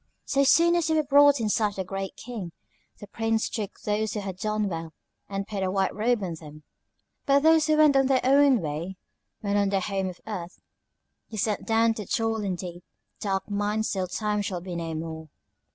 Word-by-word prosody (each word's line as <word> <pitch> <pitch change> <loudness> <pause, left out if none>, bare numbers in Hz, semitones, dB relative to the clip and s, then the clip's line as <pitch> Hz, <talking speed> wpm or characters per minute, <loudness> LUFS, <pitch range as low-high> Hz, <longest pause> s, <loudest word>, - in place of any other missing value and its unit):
So 275 0 +2
soon 335 +5 +5
as 345 -2 +1
they 320 - +2
were 310 - +3
brought 285 0 +5
in 225 - 0
sight 210 0 +1
of - - -15
the 190 - -2
Great 195 +1 -5
King, 215 -8 -7 0.5
the - - -8
Prince 225 +2 -1
took 210 -3 -5
those 215 0 -1
who 210 - -2
had 190 -2 -6
done 215 +1 -1
well, 165 -3 -5 0.4
and 195 0 -3
put 205 -2 -4
a 190 - 0
white 190 0 0
robe 225 0 +1
on 175 -3 -3
them; 150 -1 -12 0.6
but 280 0 +5
those 320 -1 +5
who 310 0 +3
went 305 -2 +6
their 265 -1 +3
own 275 -3 +5
way 165 +5 -4 0.4
when 205 -1 0
on 200 -1 +2
the 195 -1 +1
Home 190 0 -2
of 180 - -10
Earth, 180 -5 -6 0.7
he 220 - -8
sent 210 0 -1
down 225 0 +3
to 210 -4 -7
toil 225 -1 0
in 190 -2 -1
deep, 175 -1 -8 0.4
dark 195 -2 -2
mines 210 +1 -1
till 190 -2 -1
time 210 +3 -1
shall 195 -3 -3
be 180 0 -7
no 165 -1 -4
more." 160 0 -6
205 Hz, 210 wpm, -26 LUFS, 185-230 Hz, 0.7 s, went